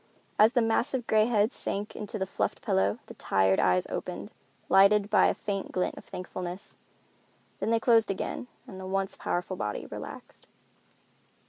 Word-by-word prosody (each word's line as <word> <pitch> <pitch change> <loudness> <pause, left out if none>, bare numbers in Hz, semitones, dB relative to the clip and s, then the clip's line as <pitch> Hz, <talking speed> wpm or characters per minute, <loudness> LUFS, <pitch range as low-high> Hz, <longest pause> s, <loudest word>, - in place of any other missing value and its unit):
As 220 +3 +6
the 245 -3 +3
massive 245 +3 +1
gray 215 -1 +4
head 220 -1 +2
sank 205 -4 -4
into 210 +1 -5
the 190 - -1
fluffed 190 - -2
pillow 195 +2 +1
the - - -10
tired 95 - +2
eyes 90 0 +3
opened, - - -5 0.4
lighted 200 +2 +5
by - - +6
a - - +1
faint 200 -2 -4
glint 180 - -1
of - - -10
thankfulness. 180 +1 -7 0.8
Then - - -1
they 230 0 +3
closed 225 -2 +4
again 195 +5 -3 0.2
and 190 - -10
the 190 - -6
once 195 0 -1
powerful 180 +1 -3
body 105 -8 -3
relaxed. - - -9
200 Hz, 160 wpm, -28 LUFS, 185-225 Hz, 0.8 s, As